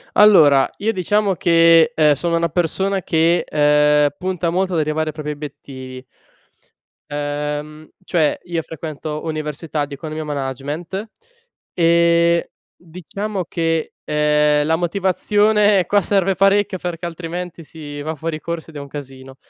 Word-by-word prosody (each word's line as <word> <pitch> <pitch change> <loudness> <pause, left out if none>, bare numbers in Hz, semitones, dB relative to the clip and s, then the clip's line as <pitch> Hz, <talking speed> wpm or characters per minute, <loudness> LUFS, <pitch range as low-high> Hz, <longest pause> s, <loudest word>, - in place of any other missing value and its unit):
Allora, 155 -10 +6
io 220 +2 -1
diciamo 200 +1 +1
che, 165 +2 +5
ehm, 150 -7 +4
sono 170 +3 -1
una 170 0 0
persona 190 +4 -1
che, 165 +1 +2
ehm, 150 0 +3
punta 180 -2 -2
molto 185 +2 -1
ad 165 - +1
arrivare 155 +1 -1
ai - - -6
propri 150 -1 -5
obiettivi 130 -3 -9 1.1
ehm, 150 +1 -4
cioè, 165 -5 +1
io 170 -2 -3
frequento 155 -1 -6
università 155 -1 -3
di 145 - -11
Economia 155 +2 -6
e - - -9
Management, 145 - -5 0.6
e 170 0 +3 0.2
diciamo 185 +3 -6
che, 165 -1 -2
ehm, 150 0 +2
la 160 - +3
motivazione, 200 +3 +2
qua 205 0 +2
serve 195 0 +1
parecchio, 195 0 +2
perché 175 -1 -5
altrimenti 170 0 -6
si 145 -2 -9
va 155 +2 -4
fuori 155 +1 -4
corso, 170 -1 -5
ed - - -20
è - - -5
un 140 - -8
casino. 135 -2 -10
165 Hz, 140 wpm, -19 LUFS, 150-180 Hz, 1.1 s, Allora